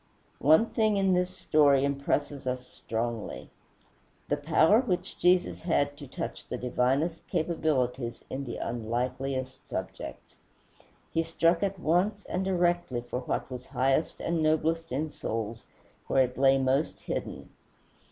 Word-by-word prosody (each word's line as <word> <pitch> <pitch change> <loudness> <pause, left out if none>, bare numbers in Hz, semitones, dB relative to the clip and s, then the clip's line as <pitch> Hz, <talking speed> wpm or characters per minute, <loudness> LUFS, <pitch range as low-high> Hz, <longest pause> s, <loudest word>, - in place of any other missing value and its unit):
One 160 +9 +6
thing 220 -3 +1
in 195 -1 +3
this 180 0 +2
story 145 -6 +3
impresses 140 0 -1
us 125 0 -2
strongly, 115 -2 -4 0.8
the 145 - +3
power 160 +8 +4
which 180 -7 -3
Jesus 180 0 +3
had 145 -4 +1
to 145 -2 -9
touch - - -6
the - - -2
divinest 135 +7 0
capabilities 135 -7 -1
in 135 +1 -4
the 120 - -5
unlikeliest 125 +3 -3
subjects. - - -6 0.8
He 165 - +3
struck 165 +1 +2
at 195 -1 0
once 190 +6 +1
and 185 - -2
directly 175 -8 +1
for 120 +1 -4
what 130 - -3
was 125 0 -7
highest 135 +4 +1
and 170 -1 0
noblest 160 +1 +1
in 150 +4 -1
souls 115 -2 -4 0.4
where 135 - +4
it 125 0 -3
lay 135 0 +5
most 135 +3 0
hidden. - - -5
145 Hz, 135 wpm, -29 LUFS, 130-170 Hz, 0.8 s, One